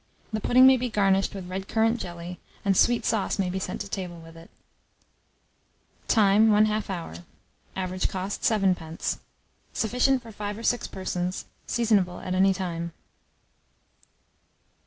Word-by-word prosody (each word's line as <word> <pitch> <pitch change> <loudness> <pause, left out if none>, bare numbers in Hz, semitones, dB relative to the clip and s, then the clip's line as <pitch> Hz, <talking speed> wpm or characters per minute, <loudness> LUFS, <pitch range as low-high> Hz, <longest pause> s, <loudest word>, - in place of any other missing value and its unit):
The 215 - -1
pudding 255 +4 +6
may 265 0 +7
be 250 0 -2
garnished 195 -2 +2
with 190 -2 -6
red 190 +1 -5
currant 225 +1 +1
jelly, 175 -1 -7 0.3
and 195 -1 +3
sweet 240 +5 +3
sauce 215 -3 0
may 190 -3 0
be 190 - -2
sent - - -4
to - - -5
table 185 -3 -5
with 165 0 -13
it. 165 +1 -14 1.6
Time. 215 0 +5
1/2 215 0 +2
hour. 170 - -5 0.6
Average 185 -1 -1
cost, 190 +2 -4
7d. 185 -7 0 0.5
Sufficient 250 +3 +1
for 230 - -10
5 205 0 -5
or 230 - -8
6 240 +1 +1
persons. 185 -1 -3 0.2
Seasonable 210 -7 +1
at 185 - -4
any 190 +1 +4
time. 170 -3 -4
195 Hz, 140 wpm, -26 LUFS, 180-220 Hz, 1.6 s, may